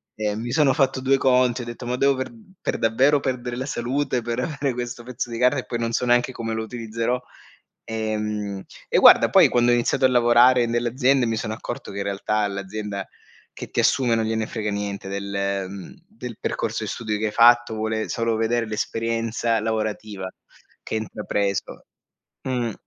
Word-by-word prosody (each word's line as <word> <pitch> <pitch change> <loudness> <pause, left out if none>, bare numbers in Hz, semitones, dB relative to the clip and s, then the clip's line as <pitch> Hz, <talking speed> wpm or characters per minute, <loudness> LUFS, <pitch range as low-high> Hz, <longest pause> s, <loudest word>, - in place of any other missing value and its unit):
ehm, 105 0 -2
mi 120 +1 -4
sono 145 -2 +4
fatto 135 -3 +1
2 135 +1 +3
conti, 125 -1 +3
ho 120 - -6
detto: 120 +1 -8
“Ma 125 - -1
devo 140 +1 +3
per 130 - -4 0.3
per - - -1
davvero 130 +6 +3
perdere 125 -1 -3
la 130 - -3
salute, 130 0 -1
per 120 +1 -3
avere 140 -2 -2
questo 120 0 -5
pezzo 120 -1 -5
di 115 - -4
carne 125 +2 +3
e - - -18
poi 120 - -4
non 115 0 -1
so 125 - 0
neanche 120 +1 +3
come 115 -2 -4
lo 110 - -2
utilizzerò?” 115 +1 -2 0.7
Ehm, 105 -3 -3 0.3
e - - +2
guarda, - - +8
poi - - +6
quando 120 0 +3
ho - - +5
iniziato 125 +3 +1
a 130 - +5
lavorare 120 0 +5
nelle 120 +1 0
aziende 130 +1 +2
mi 115 - 0
sono 110 0 -3
accorto 120 +1 -6
che 100 - -8
in - - -1
realtà 100 +2 -2
all'azienda 100 0 -3 0.5
che - - -8
ti - - -1
assume 120 -3 +3
non 110 - 0
gliene 110 0 -1
frega 110 -2 -3
niente 100 -1 -4
del 100 -1 -2
mhmm, 100 - -9
del 125 - -8
percorso - - -2
di - - -4
studi 110 -3 -3
che 110 - 0
hai 105 - -3
fatto, 120 0 +5
vuole 110 0 -2
solo 115 -1 0
veder 115 +1 0
l'esperienza 115 +1 -1
lavorativa 110 -3 -3 0.5
che - - -4
intrapreso. 105 -2 -3 0.6
Mhmm, 120 -4 -1
115 Hz, 190 wpm, -23 LUFS, 110-125 Hz, 0.7 s, guarda